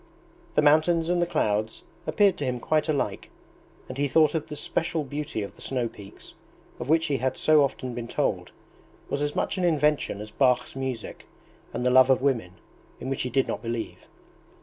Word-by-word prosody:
The 150 - +4
mountains 160 +3 +4
and 175 0 +2
the 175 - +1
clouds 110 -7 -1 0.2
appeared 205 -2 +4
to - - -4
him 125 -2 -1
quite 155 +5 0
alike, 145 -3 -1 0.6
and 130 +1 -7
he 145 - +2
thought 155 +1 +4
the 155 -1 -4
special 160 +1 -1
beauty 145 -5 -4
of 100 - -7
the - - -17
snow 125 -3 -1
peaks, 100 -3 -13 0.5
of 120 - -6
which 160 +1 +4
he 145 -4 0
had 130 +1 -1
so 155 -1 +5
often 130 -2 -3
been 120 -1 -5
told, - - -1 0.6
was 140 - -1
as 145 0 -1
much - - -1
an - - -1
invention 150 - +1
as 105 0 -8
Bach's 125 -2 +1
music 130 -4 -5 0.4
and 125 - -3
the 125 - +3
love 130 +1 +6
of 130 - +5
women, 120 -10 0 0.5
in 130 - -5
which 135 - -1
he 125 - -2
did 135 +2 +1
not - - -3
believe. 115 -1 -5
135 Hz, 195 wpm, -26 LUFS, 125-155 Hz, 0.6 s, love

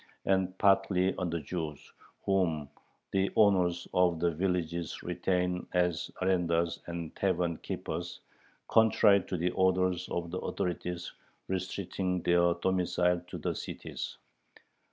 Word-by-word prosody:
and 95 -1 +1
partly 95 -1 +3
on 90 - -1
the 85 0 -1
Jews, 75 -1 -5 0.3
"whom 85 -7 +1 0.4
the 95 0 +2
owners 90 -4 +3
[of 90 -2 +3
the 85 +1 +2
villages] 85 -1 -2
retain 90 0 -1
as 90 -2 +1
arendars 85 -2 +1
and 85 -2 -5
tavern 90 -3 0
keepers, - - -5 0.5
contrary 105 -3 +5
to 90 - -2
the 90 +2 0
orders 95 -1 +1
of 85 -1 -3
the 90 - -2
authorities 90 0 -3 0.3
restricting 95 -1 -2
their 85 0 +4
domicile 90 -1 +1
to - - -6
the - - -2
cities." - - -6
90 Hz, 120 wpm, -31 LUFS, 85-95 Hz, 0.5 s, contrary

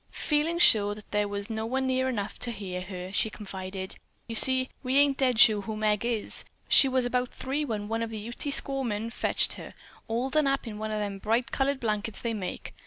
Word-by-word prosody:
Feeling 305 +3 0
sure 205 -10 +6
that 210 - -14
there 210 0 +1
was 200 0 -4
no 220 -1 -4
one 265 +2 -1
near 260 0 +1
enough 210 -4 -4
to 245 - -1
hear 190 -4 -5
her, 185 0 -7
she 220 - +2
confided: 190 -2 -7 0.3
"You 230 - -5
see, 260 +3 +5
we 260 +1 0
ain't 280 -1 +3
dead 255 -3 +2
sure 215 -3 +7
who 215 +1 -5
Meg 210 -1 +1
is. 235 -3 -2 0.2
She 275 - +8
was 260 -1 +1
about 250 0 0
three 275 +3 -3
when 215 -7 -4
one 225 +1 -2
of 230 - -2
the 225 - -6
Ute 225 +3 -8
squaw 275 -1 0
women 225 -3 -3
fetched - - +1
her, - - -10 0.3
all 240 +4 -2
done 305 -1 +3
up 275 0 0
in 215 -2 -7
one 215 0 -3
of 215 - -2
them 200 -1 -4
bright 230 +4 0
colored 275 0 0
blankets 215 -2 -2
they 235 -1 -2
make. 195 -4 -6
225 Hz, 225 wpm, -27 LUFS, 210-260 Hz, 0.3 s, She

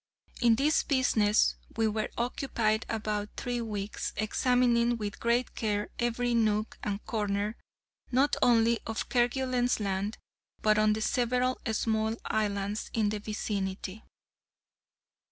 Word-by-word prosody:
In 235 -2 +5
this 295 +6 +3
business 225 -6 +2 0.2
we 225 -1 +3
were 215 0 -1
occupied 235 -3 0
about 210 -2 -2
three 245 -1 -2
weeks, 210 -2 -4
examining 240 +1 +2
with 205 -2 -5
great 235 +2 +1
care 210 -2 -1
every 240 0 0
nook 215 -2 +1
and 205 0 -3
corner, 210 -1 -1 0.6
not 270 +3 +3
only 230 -1 +4
of 225 0 -3
Kerguelen's 250 0 +1
Land, 200 +1 -2 0.5
but 215 0 +4
of 215 0 +4
the 220 - -4
several 250 +2 +1
small 220 0 0
islands 205 0 -1
in 215 -2 +2
the 210 0 -2
vicinity. 205 -1 -4
220 Hz, 120 wpm, -29 LUFS, 210-240 Hz, 0.6 s, In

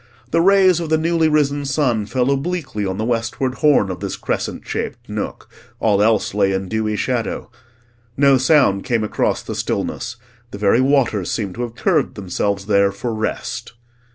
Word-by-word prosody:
The 165 - +3
rays 190 -1 +5
of 165 -2 -4
the 160 - +3
newly 165 0 +2
risen 145 -1 +1
sun 130 -7 0
fell 130 +3 +1
obliquely 140 - -2
on 95 0 -3
the 110 - -2
westward 120 +3 -1
horn 145 -11 +4
of 90 - -6
this - - -4
crescent - - -4
shaped - - -4
nook: - - -5 0.3
all 105 -2 +2
else 110 -2 +2
lay 100 -1 +2
in 95 0 -2
dewy 110 +1 -1
shadow. 120 +1 -2 0.7
No 140 -1 +5
sound 130 -8 +3
came 115 -3 0
across 105 - -1
the - - -5
stillness; 115 - -3 0.3
the 100 - -8
very 105 +4 +3
waters 130 -8 +2
seemed 100 -4 -2
to 120 - -6
have 120 -1 -4
curved 160 -4 +1
themselves 100 0 -2
there 100 -1 +3
for 110 +4 -4
rest. 110 +1 -4
120 Hz, 175 wpm, -20 LUFS, 105-145 Hz, 0.7 s, rays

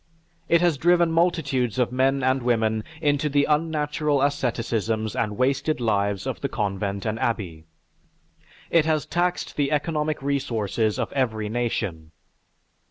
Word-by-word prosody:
It 170 0 +4
has 170 -6 +2
driven 175 +1 +4
multitudes 150 - +1
of 125 -2 +1
men 135 +1 +1
and 130 +1 +2
women 110 -3 +1 0.2
into 145 0 +1
the 145 0 +3
unnatural 150 -1 0
asceticisms 115 -6 -1
and 105 -2 -1
wasted 140 +4 +1
lives 100 -4 0
of - - -4
the - - -1
convent 100 -1 -2
and 110 0 -2
abbey. 90 -10 -2 1.1
It 165 -2 +4
has 155 -2 +1
taxed 175 +1 -1
the 140 -2 +1
economic 150 0 0
resources 115 -6 -1
of - - -3
every 110 -6 -1
nation. 100 -9 -3
130 Hz, 135 wpm, -24 LUFS, 110-150 Hz, 1.1 s, It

